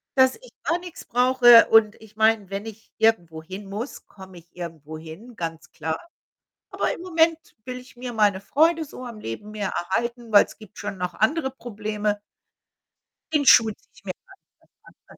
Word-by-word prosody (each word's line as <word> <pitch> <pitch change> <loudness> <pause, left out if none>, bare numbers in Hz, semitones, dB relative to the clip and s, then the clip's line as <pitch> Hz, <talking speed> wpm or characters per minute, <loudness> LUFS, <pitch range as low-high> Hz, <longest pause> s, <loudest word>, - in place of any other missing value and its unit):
Dass 260 -1 +5
ich - - -17
gar 335 +1 0
nichts 355 -1 -10
brauche 245 -1 +6
und 220 -1 +5
ich 215 -1 -16
meine, 220 -3 +2
wenn 200 +2 -5
ich 220 0 -11
irgendwo 175 -8 +1
hin 190 +4 -8
muss, 215 +7 -6
komme 190 -2 -13
ich 170 +1 -25
irgendwo 160 -3 -8
hin, 165 +10 -11
ganz 165 -2 -6
klar. 160 0 -3 0.7
Aber - - -1
im - - -9
Moment 330 -2 +2 0.3
will 255 0 -5
ich 250 -1 -14
mir 250 0 -5
meine 205 -3 +2
Freude 320 +7 +2
so 255 -2 -10
am 235 -3 -8
Leben 205 - -7
mehr 205 -2 -3
erhalten, 235 +6 -3
weil 205 - +7
's - - -14
gibt 215 -2 -15
schon 195 - -5
noch 180 -1 -3
andere 265 +5 +1
Probleme. 210 -4 -3 1.1
Den 290 -2 +2
Schuh 225 -3 +7
ziehe 210 - -18
ich - - -20
mir 185 - -2
gar 385 - -17 0.6
nicht - - -32
erst - - -30
an. - - -16
220 Hz, 190 wpm, -24 LUFS, 190-250 Hz, 1.1 s, weil